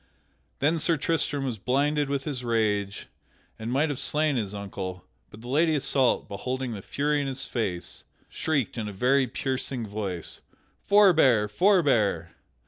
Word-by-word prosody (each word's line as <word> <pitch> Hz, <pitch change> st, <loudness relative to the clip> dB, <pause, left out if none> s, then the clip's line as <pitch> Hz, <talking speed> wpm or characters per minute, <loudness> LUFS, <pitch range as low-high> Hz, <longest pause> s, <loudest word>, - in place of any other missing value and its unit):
Then 160 Hz, +4 st, +1 dB
Sir 165 Hz, +1 st, +2 dB
Tristram 145 Hz, -2 st, -1 dB
was 120 Hz, -5 st, -3 dB
blinded 145 Hz, +5 st, +1 dB
with 140 Hz, -1 st, -1 dB
his 135 Hz, -4 st, -4 dB
rage 105 Hz, -4 st, 0 dB, 0.5 s
and 110 Hz, +2 st, -4 dB
might 145 Hz, +5 st, +2 dB
have 145 Hz, -, -3 dB
slain 150 Hz, -1 st, +1 dB
his 105 Hz, -5 st, -2 dB
uncle, 95 Hz, -3 st, -6 dB, 0.2 s
but 105 Hz, -, -13 dB
the 120 Hz, -, -10 dB
Lady 155 Hz, +5 st, +2 dB
Isoult, 135 Hz, -2 st, +2 dB
beholding 125 Hz, +5 st, -4 dB
the 100 Hz, -, -6 dB
fury 145 Hz, +7 st, 0 dB
in 140 Hz, -, -2 dB
his 135 Hz, 0 st, -3 dB
face, 95 Hz, -8 st, -3 dB, 0.2 s
shrieked 140 Hz, -7 st, -1 dB
in 110 Hz, -, -3 dB
a 105 Hz, -, -6 dB
very 130 Hz, +6 st, +2 dB
piercing 130 Hz, -1 st, -2 dB
voice, 100 Hz, -5 st, -5 dB, 0.5 s
"Forbear! 160 Hz, -, +5 dB
Forbear!" 115 Hz, -, +2 dB
130 Hz, 150 wpm, -26 LUFS, 105-145 Hz, 0.5 s, Forbear